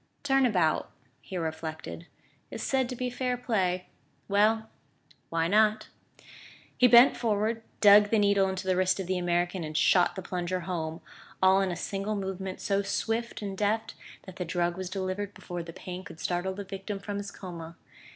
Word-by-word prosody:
"Turn 270 -2 +4
about," 180 -8 +1 0.3
he 185 - -6
reflected, 160 0 -5 0.4
"is - - -6
said 265 -2 +1
to 255 - -4
be 250 0 -3
fair 250 0 -1
play.... 185 -7 0 0.4
Well, 215 +2 +3 0.6
why 165 0 +1
not?" 215 +3 +3 0.9
He 250 - +6
bent 240 +2 +8
forward, 225 0 0 0.2
dug 205 0 +8
the 225 - +3
needle 200 -2 +3
into 190 0 -4
the 185 -1 +2
wrist 185 +1 +2
of 190 - -2
the 185 0 -1
American 175 0 0
and 155 0 -4
shot 180 +1 +4
the 190 - -6
plunger 180 0 -2
home, 165 -2 -4 0.4
all 190 +1 +5
in 190 -1 0
a - - -3
single 195 +4 -3
movement 190 -1 -4
so 200 0 +1
swift 225 +3 -2
and 195 -1 -4
deft 210 +3 0 0.3
that 185 -1 -11
the 180 - -2
drug 175 +1 0
was 185 -1 -5
delivered 190 +1 -3
before 175 -1 -6
the 165 0 -8
pain 180 +2 -7
could 160 - -11
startle 180 +2 -2
the 200 - -5
victim 195 +1 -5
from 200 +1 -5
his 200 0 -5
coma. 170 -4 -8
190 Hz, 180 wpm, -28 LUFS, 180-210 Hz, 0.9 s, bent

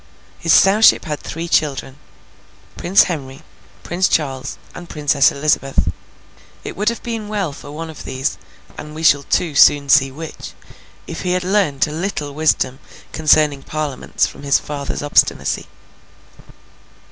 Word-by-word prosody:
His 165 - 0
Sowship 205 +6 +5
had 150 -2 -4
three 165 +2 -6
children: 140 -3 -1 0.8
Prince 190 +3 +4
Henry, 135 -6 -6 0.4
Prince 180 +2 0
Charles, 135 -2 -2 0.2
and 175 -1 -10
the - - -12
Princess 145 -2 +3
Elizabeth. 140 -1 0 0.7
It - - -7
would 210 +3 +1
have 235 - -6
been 225 -3 -4
well 200 -8 -2
for 145 - -11
one 165 +2 -6
of 160 -2 -10
these, 130 +3 -3 0.4
and 150 0 -9
we 160 - -6
shall 145 -3 +5
too 155 +3 -1
soon 145 0 +5
see 135 -1 +5
which, 160 +3 -9 0.5
if 165 - -7
he 180 -1 -1
had 180 0 -1
learnt 185 -8 +1
a 150 - -7
little 155 -3 -4
wisdom 140 -3 0 0.3
concerning 150 -2 +3
Parliaments 150 -3 -2
from - - -9
his 140 -1 +3
father's 145 -1 -5
obstinacy. 145 - +1
150 Hz, 145 wpm, -18 LUFS, 140-175 Hz, 0.8 s, Sowship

